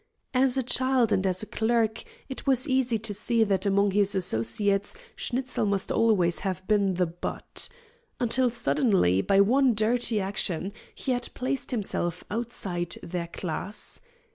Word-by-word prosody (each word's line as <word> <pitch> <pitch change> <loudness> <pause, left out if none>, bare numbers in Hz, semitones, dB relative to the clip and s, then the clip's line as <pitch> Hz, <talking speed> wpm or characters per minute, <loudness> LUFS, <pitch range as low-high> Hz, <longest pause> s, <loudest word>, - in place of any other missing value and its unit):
As 260 0 +3
a 265 - +1
child 255 -1 +2
and 190 +1 +2
as 185 +2 0
a - - -3
clerk, 225 0 0 0.2
it 265 - -8
was 265 +1 +2
easy 260 -3 +2
to 215 -1 -4
see 225 +3 +2
that 195 -2 0
among 200 0 +3
his 200 0 +2
associates 190 - +1 0.2
Schnitzel 255 -3 -2
must 200 -1 -1
always 185 -7 +2
have 185 -1 -4
been 200 -3 +2
the 180 0 +2
butt. 170 +1 -5 0.5
Until 245 +1 +2
suddenly, 220 - +2
by 195 - +3
one 250 +3 +4
dirty 225 +1 +1
action, 190 -1 -1 0.2
he 265 - -3
had 245 -1 -1
placed 260 +1 -2
himself 195 -7 -2
outside 195 -7 -3
their 170 0 -4
class. 180 +4 -3
210 Hz, 150 wpm, -27 LUFS, 190-245 Hz, 0.5 s, one